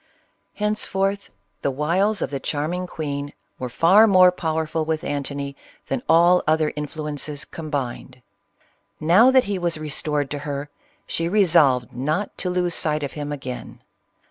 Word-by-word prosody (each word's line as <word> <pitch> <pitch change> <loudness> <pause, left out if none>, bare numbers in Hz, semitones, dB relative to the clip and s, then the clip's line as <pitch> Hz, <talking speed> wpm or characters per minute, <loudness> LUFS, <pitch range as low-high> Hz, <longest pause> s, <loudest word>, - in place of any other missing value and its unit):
Henceforth 200 -2 -1 0.3
the - - 0
wiles 170 +9 0
of - - -4
the 140 - -3
charming 160 +7 -2
queen 145 -3 -5 0.3
were 130 - -3
CLEOPATRA. 120 - -19
far 195 +7 +7
more 185 -3 +6
powerful 160 -2 -2
with 160 0 -2
Antony 140 -1 -4 0.3
than 135 -2 -1
all 175 +2 +5
other 155 0 +2
influ 150 0 -5
ences 145 +1 -4
combined. 130 -5 -5 0.8
Now 180 +11 +5
that 260 -1 +5
he 200 -1 -3
was 170 -2 0
restored 150 -1 -2
to 145 - -3
her, 145 0 -5 0.3
she 165 0 -2
resolved 155 - +3
not 150 - -2
to 180 - 0
lose 180 -1 0
sight 150 -2 0
of 140 - -3
him 145 -1 -5
again. 130 -3 -7
155 Hz, 150 wpm, -22 LUFS, 145-180 Hz, 0.8 s, far